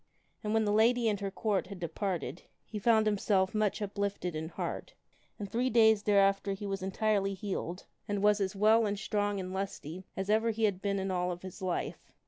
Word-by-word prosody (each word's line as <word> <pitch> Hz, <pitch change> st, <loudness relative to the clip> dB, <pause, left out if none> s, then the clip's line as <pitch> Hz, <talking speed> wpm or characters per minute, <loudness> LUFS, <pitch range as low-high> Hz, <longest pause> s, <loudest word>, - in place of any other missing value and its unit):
And 210 Hz, -, -2 dB
when 220 Hz, -1 st, +3 dB
the 205 Hz, -, +1 dB
Lady 230 Hz, +2 st, +4 dB
and 205 Hz, -2 st, +1 dB
her 200 Hz, -1 st, -2 dB
Court 200 Hz, -1 st, -1 dB
had 195 Hz, -1 st, -8 dB
departed, 175 Hz, -1 st, -3 dB, 0.2 s
he 215 Hz, -, -6 dB
found 220 Hz, +1 st, +4 dB
himself 195 Hz, -2 st, +2 dB
much 215 Hz, -1 st, 0 dB
uplifted 200 Hz, -4 st, -3 dB
in 160 Hz, +1 st, -4 dB
heart, -, -, -5 dB, 0.4 s
and 205 Hz, -, -5 dB
three 245 Hz, +5 st, 0 dB
days 220 Hz, -3 st, +5 dB
t 210 Hz, -, 0 dB
after 195 Hz, 0 st, +3 dB
he 195 Hz, +1 st, -6 dB
was 195 Hz, -1 st, -3 dB
entirely 195 Hz, 0 st, 0 dB
healed 185 Hz, -2 st, -4 dB, 0.2 s
and 205 Hz, -1 st, -1 dB
was 210 Hz, 0 st, +4 dB
as 190 Hz, 0 st, -1 dB
well 215 Hz, +2 st, +4 dB
and 205 Hz, 0 st, -2 dB
strong 205 Hz, -1 st, -1 dB
and 185 Hz, 0 st, -5 dB
lusty 190 Hz, -2 st, -5 dB
as 190 Hz, 0 st, -2 dB
evei 220 Hz, +2 st, +3 dB
he 225 Hz, +1 st, -3 dB
had 195 Hz, -3 st, +1 dB
been 200 Hz, -1 st, 0 dB
in 190 Hz, 0 st, -2 dB
all 180 Hz, 0 st, 0 dB
of 175 Hz, +1 st, -7 dB
his 185 Hz, +1 st, -9 dB
life. 185 Hz, -2 st, -3 dB
200 Hz, 210 wpm, -31 LUFS, 190-215 Hz, 0.4 s, days